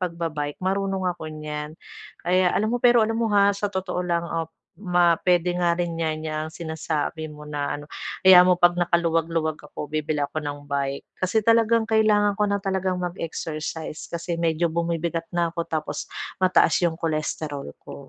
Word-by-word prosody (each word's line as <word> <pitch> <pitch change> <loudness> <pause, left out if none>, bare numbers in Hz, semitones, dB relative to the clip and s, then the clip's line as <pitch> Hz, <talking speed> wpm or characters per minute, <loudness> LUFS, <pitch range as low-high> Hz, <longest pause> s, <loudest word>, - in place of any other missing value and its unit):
pagba-bike, 165 -5 -3
marunong 195 0 0
ako 160 -2 -8
niyan. 150 0 -6 0.5
Kaya 180 +1 +3
alam 215 +2 +1
mo, 245 - 0
pero 240 -2 +5
alam 225 +1 -1
mo, 225 - +1
ha, 200 0 +5
sa 200 +1 -2
totoo 190 -2 -3
lang 170 -1 0
op 165 -1 -3 0.3
ma 175 -3 +3
p'wede 180 -1 +2
nga 170 -1 +2
rin 175 -1 -1
'yan, 155 -1 -2
'yang 155 0 -3
sinasabi 160 -1 -3
mo 150 0 -11
na 145 -1 -3
ano. 145 - -9 0.4
Hayaan 185 -1 +9
mo, 180 - +6
'pag 175 0 +5
nakaluwag-luwag 165 -2 +1
ako 150 0 -8
bibili 155 -1 -1
ako 150 +2 -4
ng 145 -1 -6
bike. 140 -1 -2 0.2
Kasi 195 +4 +1
talagang 230 0 +4
kailangan 215 -2 +3
ko 210 0 +2
na 200 - +1
talagang 190 -1 0
mag-exercise 160 -3 -5
kasi 170 0 -4
medyo 165 0 +1
bumibigat 165 0 -2
na 170 -1 +1
ako 170 -1 -4
tapos 155 -2 -3 0.3
mataas 185 0 +4
yung 170 -2 +1
cholesterol 155 - -3
ko. - - -11
170 Hz, 170 wpm, -24 LUFS, 155-185 Hz, 0.5 s, Hayaan